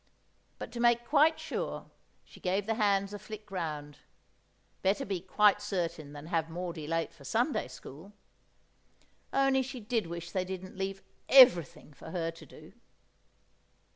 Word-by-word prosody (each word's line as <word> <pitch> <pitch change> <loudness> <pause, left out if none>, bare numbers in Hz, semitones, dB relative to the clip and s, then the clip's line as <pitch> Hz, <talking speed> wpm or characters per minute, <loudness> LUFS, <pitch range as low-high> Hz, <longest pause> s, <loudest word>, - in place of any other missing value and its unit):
But - - -7
to 240 - -6
make 240 0 +3
quite 310 +2 +4
sure, - - -4 0.4
she - - -16
gave 190 +2 0
the 225 - 0
hands 200 -2 +1
a 205 - -6
flick 215 0 -10
round; 150 -5 -4 0.8
better 195 +2 +1
be 195 -3 -2
quite 205 +2 +3
certain 170 -7 -3
than 145 0 -9
have 165 -1 -1
Maudie 170 -2 -5
late 165 +1 -1
for 155 - -17
Sunday 240 - 0
school. 160 +9 -11 1.2
Only 270 -1 +3
she 260 0 -6
did 220 -3 -1
wish 170 0 -6
they 185 - 0
didn't 185 0 -7
leave 195 0 -4 0.3
everything 175 - +6
for 135 - -11
her 165 -2 -2
to 165 - -14
do! - - -14
190 Hz, 150 wpm, -31 LUFS, 165-220 Hz, 1.2 s, everything